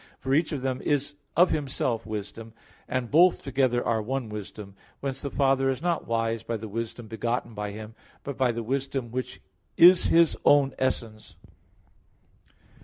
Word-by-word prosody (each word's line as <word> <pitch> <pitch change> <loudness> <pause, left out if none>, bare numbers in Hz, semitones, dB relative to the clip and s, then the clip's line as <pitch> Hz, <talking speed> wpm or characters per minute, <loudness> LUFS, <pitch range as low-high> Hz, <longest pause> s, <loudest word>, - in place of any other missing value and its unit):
For 130 0 -2
each 155 +3 +2
of 140 -4 -4
them 130 -1 -2
is 145 0 0 0.2
of 180 +2 +5
Himself 130 -6 -2
Wisdom; 110 +1 -6 0.3
and 125 -2 -3
both 175 +4 +5
together 130 -3 +1
are 110 -1 +1
one 125 +1 -3
Wisdom. 105 -1 -8 0.3
Whence 135 -1 -4
the 140 - -3
Father 135 -1 +2
is 130 -2 -1
not 170 0 -1
wise 115 -1 -1
by 115 0 -3
the 110 +1 -7
wisdom 115 +2 -5
begotten 115 +2 -3
by 105 -1 -4
Him, 110 +2 -8 0.3
but 140 - -5
by 130 -2 +2
the 115 0 -4
wisdom 135 0 -3
which 130 +1 -5 0.4
is 180 +1 +8
His 170 -1 +4
own 140 -2 +4
essence. 115 -4 -3
125 Hz, 165 wpm, -26 LUFS, 115-135 Hz, 0.4 s, is